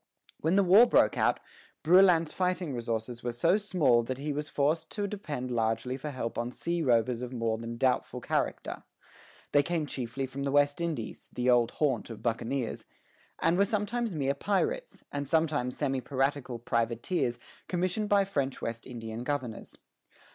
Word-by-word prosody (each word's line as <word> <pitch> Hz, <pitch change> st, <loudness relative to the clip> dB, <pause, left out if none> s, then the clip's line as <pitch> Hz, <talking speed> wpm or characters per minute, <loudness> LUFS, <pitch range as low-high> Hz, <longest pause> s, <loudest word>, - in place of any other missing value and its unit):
When 165 Hz, +4 st, +1 dB
the 200 Hz, -, +5 dB
war 200 Hz, +7 st, +7 dB
broke -, -, +4 dB
out, -, -, +2 dB, 0.4 s
Brouillan's 170 Hz, -1 st, +5 dB
fighting 180 Hz, -4 st, -1 dB
resources 115 Hz, 0 st, -3 dB
were 120 Hz, -, -2 dB
so 165 Hz, -, +3 dB
small 170 Hz, -, +3 dB
that 125 Hz, +2 st, -4 dB
he 145 Hz, +2 st, -3 dB
was 150 Hz, +1 st, -4 dB
forced 155 Hz, +3 st, 0 dB
to 205 Hz, -, -1 dB
depend 150 Hz, -11 st, -4 dB
largely 115 Hz, +2 st, 0 dB
for 140 Hz, +3 st, -5 dB
help 130 Hz, -4 st, -4 dB
on 120 Hz, +1 st, -2 dB
sea 170 Hz, +5 st, -2 dB
rovers 120 Hz, -3 st, +2 dB
of 125 Hz, -1 st, -5 dB
more 115 Hz, -3 st, -1 dB
than 115 Hz, 0 st, -6 dB
doubtful 130 Hz, 0 st, +1 dB
character. -, -, -2 dB, 0.7 s
They 145 Hz, -, +5 dB
came 165 Hz, +1 st, -1 dB
chiefly 130 Hz, -1 st, -4 dB
from 130 Hz, +1 st, -7 dB
the 140 Hz, 0 st, -1 dB
West 145 Hz, +2 st, +3 dB
Indies, 155 Hz, -10 st, -4 dB
the 125 Hz, 0 st, +2 dB
old 120 Hz, -1 st, +4 dB
haunt 135 Hz, -8 st, 0 dB
of 115 Hz, -, -9 dB
buccaneers, 115 Hz, +2 st, -2 dB, 0.6 s
and 175 Hz, +3 st, +3 dB
were -, -, +6 dB
sometimes 210 Hz, +1 st, -1 dB
mere 140 Hz, -2 st, +1 dB
pirates, 430 Hz, -, -1 dB
and 145 Hz, -1 st, -3 dB
sometimes 150 Hz, -5 st, +1 dB
semi 135 Hz, -3 st, 0 dB
piratical 135 Hz, -2 st, -1 dB
privateers 120 Hz, +3 st, -1 dB, 0.3 s
commissioned 185 Hz, +4 st, -1 dB
by 200 Hz, -1 st, +4 dB
French 140 Hz, -8 st, -2 dB
West 115 Hz, 0 st, -5 dB
Indian 115 Hz, -2 st, -6 dB
governors. 130 Hz, -5 st, -4 dB
140 Hz, 165 wpm, -29 LUFS, 120-170 Hz, 0.7 s, war